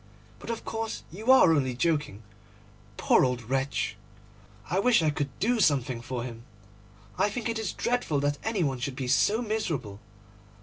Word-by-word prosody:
But - - -10
of 230 - -4
course 225 -1 -4
you 215 +9 +1
are 260 -11 +7
only 130 -5 0
joking. 145 -6 -1 0.7
Poor - - +4
old 125 -2 0
wretch! 135 +1 -1 0.7
I 185 - 0
wish 230 -4 +4
I 155 - +3
could 145 -1 -2
do 235 +4 +1
something 135 - +2
for 120 0 -4
him. 115 -2 -7 0.8
I 205 - +3
think 235 +2 -4
it 230 -1 -2
is 220 -4 -2
dreadful 240 -12 -1
that 145 0 0
any 220 -5 0
one 135 -4 -1
should 130 +1 -3
be 130 -1 -4
so 210 - +2
miserable. 155 - -3
150 Hz, 170 wpm, -28 LUFS, -, 0.8 s, are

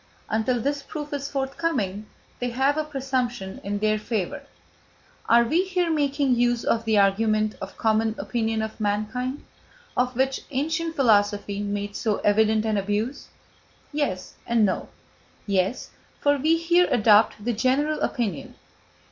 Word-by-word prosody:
Until 225 +3 +1
this 285 +4 -1
proof 295 +1 -7
is 280 0 -3
forthcoming 265 - -2 0.3
they 245 - -1
have 265 +4 +1
a 310 - 0
presumption 255 -8 -3
in 205 +1 -2
their 215 +1 +1
favour. 225 +6 -3 0.9
Are 235 0 +6
we 320 +10 +2
here 365 -3 0
making 285 -3 +1
use 240 -1 +1
of 230 0 0
the 220 -1 +2
argument 215 +2 +2
of 195 - -7
common 220 0 +1
opinion 225 -2 -1
of 220 +1 -6
mankind, 215 +6 -2 0.5
of 250 0 0
which 265 +1 0
ancient 320 +4 -2
philosophy 205 -4 +2
made 205 0 -3
so 215 -3 0
evident 215 +1 +3
an 215 -1 +1
abuse? 210 +6 -2 0.7
Yes, 280 -12 -2
and 230 -2 +3
no. 190 - -2 0.6
Yes, 195 +3 -1 0.3
for 285 0 +3
we 310 +4 +2
here 345 +2 +3
adopt 215 -1 +4
the 240 - +1
general 270 +7 +1
opinion. 220 - -2
235 Hz, 140 wpm, -25 LUFS, 210-280 Hz, 0.9 s, Are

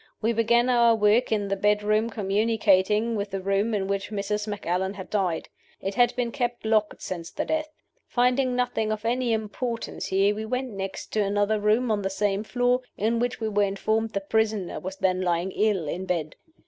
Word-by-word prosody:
We 225 +2 +1
began 235 +2 +3
our 235 -2 +5
work 220 +3 +3
in 205 -2 +1
the 195 - +1
bedroom 210 +2 +2
communicating 215 +1 +2
with 200 -1 -2
the 195 0 -3
room 195 +3 0
in 195 -2 -1
which 200 0 -2
Mrs. 210 0 -2
Macallan 190 -1 -2
had 190 -1 -9
died. 185 -6 0 0.3
It 195 - -3
had 245 +1 +3
been 245 -2 -1
kept 240 -4 -3
locked 215 -1 +1
since 170 -3 -5
the - - -3
death. 310 -1 -1 0.4
Finding 250 +1 +2
nothing 245 -3 0
of 215 0 -4
any 245 +1 +1
importance 225 +2 -3
here, 195 +2 +3
we 215 +1 -5
went 250 +3 -3
next 195 -1 -6
to 215 - +2
another 205 +2 +1
room 220 +3 +2
on 210 -1 +1
the 195 - -1
same 200 +1 0
floor, 245 +2 +1 0.2
in 230 +3 +1
which 245 -1 -1
we 220 - -1
were 205 -1 +1
informed 215 +3 0
the 200 - -1
prisoner 215 -2 0
was 190 +1 -6
then 185 -2 +1
lying 175 +1 0
ill 205 -7 +1
in 185 +5 -4
bed. 165 -4 -2
210 Hz, 195 wpm, -26 LUFS, 195-230 Hz, 0.4 s, our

